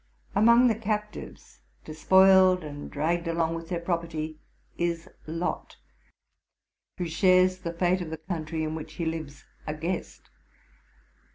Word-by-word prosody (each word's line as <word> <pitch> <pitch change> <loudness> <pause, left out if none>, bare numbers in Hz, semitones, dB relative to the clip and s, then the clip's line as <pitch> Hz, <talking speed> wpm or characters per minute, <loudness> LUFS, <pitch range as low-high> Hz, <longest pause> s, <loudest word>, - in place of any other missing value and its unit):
Among 235 +4 +6
the 230 - +3
captives, 210 -1 -5 0.3
despoiled, 185 +3 +5
and 145 -1 -7
dragged 170 +4 -1
along 165 0 0
with 165 0 -6
their 175 -2 -1
property, 165 -3 -3 0.4
is 170 -1 -2 0.2
Lot, 165 +3 -4 1.2
who 180 - -2
shares 185 +2 +3
the 170 -2 -4
fate 180 +2 +1
of 170 - -5
the 160 - -5
country 160 -1 -4
in 155 0 -2
which 160 0 -7
he 165 +2 -4
lives 160 -3 -5 0.2
a 150 - -2
guest. 170 +4 -5
170 Hz, 130 wpm, -27 LUFS, 160-185 Hz, 1.2 s, Among